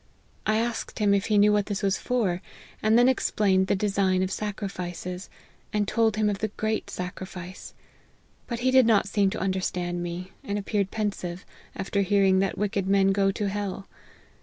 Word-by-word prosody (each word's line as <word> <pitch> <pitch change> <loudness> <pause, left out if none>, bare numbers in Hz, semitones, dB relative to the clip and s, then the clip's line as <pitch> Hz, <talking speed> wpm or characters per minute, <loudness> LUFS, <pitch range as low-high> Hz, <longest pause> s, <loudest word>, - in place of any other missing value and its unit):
I 215 - +3
asked 230 0 -2
him 205 -2 +3
if 200 -1 +1
he 215 -2 +3
knew 210 +1 +6
what 205 -1 +1
this 205 0 -3
was 195 0 +1
for, 205 -8 0 0.4
and 215 +1 +4
then 245 +1 +6
explained 200 -6 +2
the - - +2
design 195 -2 +1
of 190 - -2
sacrifices; 185 -3 -5 0.4
and 210 -1 0
told 225 -1 +2
him 215 0 +1
of 205 -2 -1
the 215 - 0
great 215 +1 -2
sacrifice, 185 0 -7 0.7
but 235 -1 -4
he 255 +1 +3
did 260 -2 +6
not 215 -4 +4
seem 200 -1 +2
to 215 - -4
understand 180 -2 -1
me, 175 +2 -5
and 200 0 -2
ap 200 - -5
peared 200 -3 0
pensive, 195 -4 -3 0.3
after 200 +1 -1
hearing 195 -1 +3
that 195 0 0
wicked 200 -1 -1
men 195 0 +4
go 195 0 +2
to 205 +1 -2
hell. 200 -1 -4
200 Hz, 185 wpm, -26 LUFS, 190-210 Hz, 0.7 s, knew